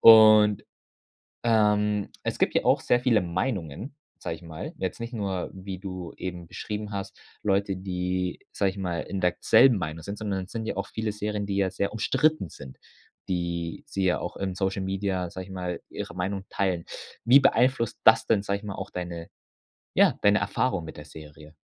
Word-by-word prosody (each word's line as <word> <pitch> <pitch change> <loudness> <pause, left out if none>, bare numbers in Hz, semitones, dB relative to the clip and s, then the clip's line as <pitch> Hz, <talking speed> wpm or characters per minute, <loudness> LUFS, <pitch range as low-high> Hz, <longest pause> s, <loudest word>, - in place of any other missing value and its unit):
Und, 110 -2 +8 0.8
ähm, 105 -2 +3
es - - -2
gibt - - +2
ja - - +2
auch - - +4
sehr 120 - +3
viele 120 -4 +3
Meinungen, 95 - -3 0.2
sage 80 - -4
ich 80 - -15
mal, 80 0 -7
jetzt 95 +4 -3
nicht 115 +2 -6
nur, 95 -5 -2
wie 95 0 -6
du 90 -3 -6
eben 90 -2 -5
beschrieben 105 +2 -5
hast, 100 -1 -5 0.2
Leute, 100 -1 +1
die, 90 -1 -2
sage 100 - +1
ich 95 - -13
mal, 90 -3 -2
in 95 - -4
der 90 -1 +3
k - - -34
selben 120 +1 +6
Meinung 80 -2 -4
sind, 100 +5 -6
sondern 100 -3 -2
es - - -17
sind 110 -1 -4
ja - - -2
auch - - -3
viele 110 -1 -2
Serien, 105 0 -3
die 100 -1 -2
ja 95 -1 +2
sehr 100 +2 -2
umstritten 130 - +1
sind, 65 -2 -11 0.5
die 85 +5 -2
sie 95 -8 -1
ja 90 - +2
auch - - -5
im 95 -2 -3
Social 95 0 -1
Media, 95 -2 -1
sage 95 +1 -7
ich 95 - -12
mal, 90 -2 -4
ihre 85 - -6
Meinung 95 +2 -2
teilen. 90 -4 -1 0.4
Wie 125 +4 +8
beeinflusst 125 -3 +2
das 110 0 +6
denn, 100 - +3
sage 100 0 -1
ich 100 - -14
mal, 105 -2 -4
auch 95 +1 -6
deine, 85 -3 -6 0.6
ja, - - +4
deine 100 +1 +5
Erfahrung 125 -10 0
mit 80 - -9
der 75 - -9
Serie? 75 0 -12
95 Hz, 195 wpm, -27 LUFS, 90-105 Hz, 0.8 s, Und